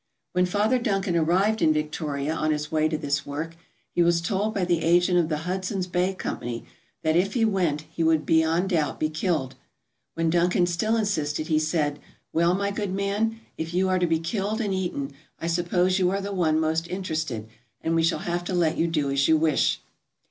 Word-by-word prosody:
When 180 Hz, 0 st, +2 dB
Father 210 Hz, +7 st, +2 dB
Duncan 195 Hz, -6 st, 0 dB
arrived 185 Hz, +7 st, +2 dB
in 155 Hz, -, +5 dB
Victoria 150 Hz, -1 st, -2 dB
on 155 Hz, -1 st, -1 dB
his 150 Hz, 0 st, -2 dB
way 155 Hz, 0 st, +2 dB
to 155 Hz, -, -1 dB
this 140 Hz, -1 st, -1 dB
work 155 Hz, +4 st, -5 dB, 0.4 s
he 175 Hz, -, +2 dB
was 170 Hz, 0 st, +4 dB
told 200 Hz, +5 st, -1 dB
by 195 Hz, -4 st, -1 dB
the 175 Hz, -2 st, +1 dB
agent 175 Hz, +2 st, +4 dB
of 165 Hz, -2 st, +1 dB
the 155 Hz, -, 0 dB
Hudson's 185 Hz, +1 st, -2 dB
Bay 180 Hz, +1 st, 0 dB
Company 120 Hz, -9 st, -4 dB, 0.4 s
that 155 Hz, 0 st, +2 dB
if 195 Hz, +6 st, +1 dB
he 230 Hz, -2 st, +3 dB
went 180 Hz, -8 st, +1 dB
he 165 Hz, -, -4 dB
would 160 Hz, -1 st, +3 dB
beyond 165 Hz, +3 st, +2 dB
doubt 155 Hz, -5 st, 0 dB
be 155 Hz, 0 st, 0 dB
killed. 155 Hz, -5 st, -1 dB, 0.6 s
When 165 Hz, -1 st, +1 dB
Duncan 175 Hz, +1 st, +3 dB
still 180 Hz, +6 st, 0 dB
insisted, 155 Hz, -8 st, -1 dB
he 155 Hz, -1 st, +3 dB
said: 155 Hz, -2 st, 0 dB, 0.3 s
"Well, 170 Hz, +2 st, +3 dB
my 200 Hz, +1 st, -1 dB
good 200 Hz, -2 st, -3 dB
man, 210 Hz, +3 st, -1 dB, 0.2 s
if 165 Hz, +2 st, -4 dB
you 190 Hz, +1 st, +2 dB
are 185 Hz, 0 st, +2 dB
to 175 Hz, -, +2 dB
be 165 Hz, -1 st, +2 dB
killed 200 Hz, +6 st, -2 dB
and 205 Hz, -4 st, -1 dB
eaten 175 Hz, -7 st, -2 dB, 0.3 s
I -, -, -5 dB
suppose 175 Hz, +2 st, +1 dB
you 180 Hz, -1 st, +3 dB
are 195 Hz, +1 st, 0 dB
the 200 Hz, +1 st, -4 dB
one 160 Hz, -4 st, +2 dB
most 160 Hz, +1 st, 0 dB
interested, 160 Hz, -, -3 dB, 0.3 s
and 165 Hz, -, -1 dB
we 165 Hz, -, +3 dB
shall 165 Hz, +1 st, 0 dB
have 175 Hz, 0 st, -1 dB
to 185 Hz, -, -2 dB
let 165 Hz, -3 st, +1 dB
you 170 Hz, -, +3 dB
do 150 Hz, -4 st, 0 dB
as 140 Hz, 0 st, +2 dB
you 160 Hz, -, +5 dB
wish. 155 Hz, -2 st, +2 dB
170 Hz, 205 wpm, -25 LUFS, 155-190 Hz, 0.6 s, in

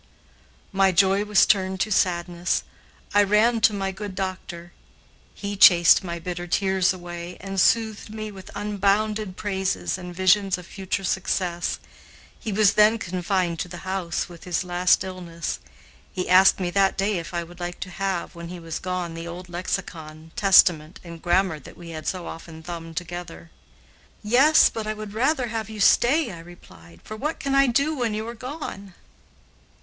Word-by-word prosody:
My 195 Hz, 0 st, +3 dB
joy 195 Hz, +3 st, +3 dB
was 210 Hz, -1 st, +5 dB
turned 190 Hz, -2 st, +1 dB
to 215 Hz, -, -1 dB
sadness. 175 Hz, -2 st, 0 dB, 0.5 s
I 205 Hz, -, +6 dB
ran 215 Hz, +3 st, +3 dB
to 225 Hz, -, +5 dB
my 195 Hz, -2 st, -2 dB
good 195 Hz, 0 st, -7 dB
doctor. 185 Hz, -3 st, -5 dB, 0.6 s
He 205 Hz, 0 st, -5 dB
chased 175 Hz, -2 st, +7 dB
my 170 Hz, -2 st, -4 dB
bitter 175 Hz, +1 st, -5 dB
tears 190 Hz, 0 st, +2 dB
away, 175 Hz, -1 st, -7 dB
and 195 Hz, 0 st, -2 dB
soothed 220 Hz, -2 st, +1 dB
me 215 Hz, -1 st, -6 dB
with 190 Hz, -2 st, -12 dB
unbounded 205 Hz, 0 st, 0 dB
praises 190 Hz, -2 st, -2 dB
and 180 Hz, -1 st, -8 dB
visions 190 Hz, +2 st, +2 dB
of 180 Hz, -, -11 dB
future 195 Hz, +1 st, -4 dB
success. 180 Hz, -2 st, -1 dB, 0.6 s
He 220 Hz, -, -5 dB
was 205 Hz, 0 st, +4 dB
then 215 Hz, +2 st, +5 dB
confined 180 Hz, -3 st, -2 dB
to -, -, -3 dB
the 175 Hz, +1 st, -10 dB
house 185 Hz, -3 st, -2 dB
with 170 Hz, -2 st, -13 dB
his 180 Hz, +1 st, -1 dB
last 180 Hz, 0 st, +2 dB
illness. 175 Hz, -3 st, -5 dB, 0.5 s
He 180 Hz, -, -3 dB
asked 190 Hz, +2 st, +6 dB
me 180 Hz, -2 st, -2 dB
that 195 Hz, +1 st, +2 dB
day 195 Hz, -1 st, 0 dB
if 165 Hz, -, -8 dB
I 175 Hz, -1 st, -2 dB
would 175 Hz, +1 st, -14 dB
like 175 Hz, 0 st, -5 dB
to 185 Hz, -, -5 dB
have, 190 Hz, -1 st, -3 dB
when 170 Hz, 0 st, -8 dB
he 180 Hz, +1 st, -8 dB
was 165 Hz, -1 st, -5 dB
gone, 180 Hz, -2 st, -3 dB
the 165 Hz, +1 st, -7 dB
old 175 Hz, +1 st, -8 dB
lexicon, 160 Hz, -3 st, -5 dB
Testament, 175 Hz, -4 st, +4 dB
and 170 Hz, -2 st, -10 dB
grammar 175 Hz, -2 st, +1 dB
that 130 Hz, -, -14 dB
we 170 Hz, -1 st, -10 dB
had 155 Hz, -1 st, -7 dB
so 185 Hz, -3 st, -3 dB
often 160 Hz, -1 st, -9 dB
thumbed 165 Hz, -1 st, -8 dB
together. 175 Hz, -1 st, -7 dB, 0.7 s
"Yes, 265 Hz, +9 st, +6 dB
but 220 Hz, -1 st, -5 dB
I 215 Hz, -, -2 dB
would 215 Hz, -1 st, -8 dB
rather 255 Hz, +2 st, +1 dB
have 220 Hz, -2 st, -4 dB
you 215 Hz, -1 st, -8 dB
stay," 240 Hz, +6 st, +4 dB
I 170 Hz, -, -9 dB
replied, 90 Hz, -, -15 dB
"for 215 Hz, -, -8 dB
what 300 Hz, +8 st, -3 dB
can 275 Hz, 0 st, -2 dB
I 275 Hz, 0 st, +5 dB
do 280 Hz, +6 st, +1 dB
when 235 Hz, -5 st, -1 dB
you 215 Hz, +1 st, -4 dB
are 235 Hz, -, -5 dB
gone?" 230 Hz, -, -8 dB
185 Hz, 175 wpm, -24 LUFS, 175-210 Hz, 0.7 s, chased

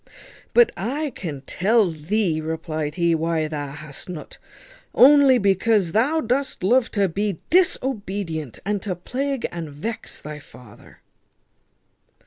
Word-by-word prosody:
"But 475 Hz, -1 st, +6 dB
I 270 Hz, -, -2 dB
can 150 Hz, -, -6 dB
tell 200 Hz, -, +2 dB
thee," 165 Hz, +1 st, -1 dB
replied 155 Hz, -1 st, -4 dB
he, 170 Hz, -1 st, +2 dB
"why 165 Hz, 0 st, 0 dB
hast 145 Hz, +1 st, -7 dB
nut; 165 Hz, -4 st, -8 dB, 0.6 s
only 275 Hz, -1 st, +7 dB
because 200 Hz, -2 st, +2 dB
thou 275 Hz, -, +2 dB
dost 260 Hz, -3 st, -2 dB
love 240 Hz, +5 st, +3 dB
to 200 Hz, -2 st, +2 dB
be 195 Hz, +1 st, -2 dB
disobedient, 205 Hz, -, 0 dB
and 205 Hz, -1 st, -1 dB
to 190 Hz, -4 st, -3 dB
plague 265 Hz, -, -3 dB
and 170 Hz, -3 st, -6 dB
vex 170 Hz, +11 st, -6 dB
thy 150 Hz, 0 st, -8 dB
father." 125 Hz, -6 st, -16 dB
190 Hz, 120 wpm, -23 LUFS, 155-235 Hz, 0.6 s, only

